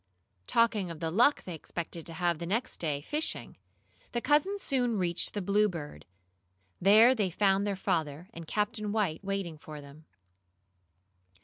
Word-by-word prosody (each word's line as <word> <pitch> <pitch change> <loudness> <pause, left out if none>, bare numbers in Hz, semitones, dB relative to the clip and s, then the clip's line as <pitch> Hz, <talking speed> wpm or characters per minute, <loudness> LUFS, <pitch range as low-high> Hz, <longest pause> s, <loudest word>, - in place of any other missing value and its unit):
Talking 225 -5 +2
of 165 -2 -7
the 165 -1 -2
luck 245 - +4
they 180 - -6
expected 165 +1 -6
to 165 - -7
have 170 -1 0
the 170 - -5
next 230 +7 -1
day, 150 -4 -2
fishing, 300 - -3 0.6
the 240 - +1
cousins 360 +10 +1
soon 245 -4 +1
reached 175 0 0
the 205 - -2
Bluebird. 180 - -1 0.7
There 215 +6 +7
they 210 -7 0
found 195 +2 +2
their 200 - 0
father 165 -4 -2
and 165 -1 -9
Captain 210 +1 -1
White 200 -6 -1
waiting 195 -5 -3
for 155 -3 -9
them. 145 +2 -14
190 Hz, 150 wpm, -30 LUFS, 165-215 Hz, 0.7 s, There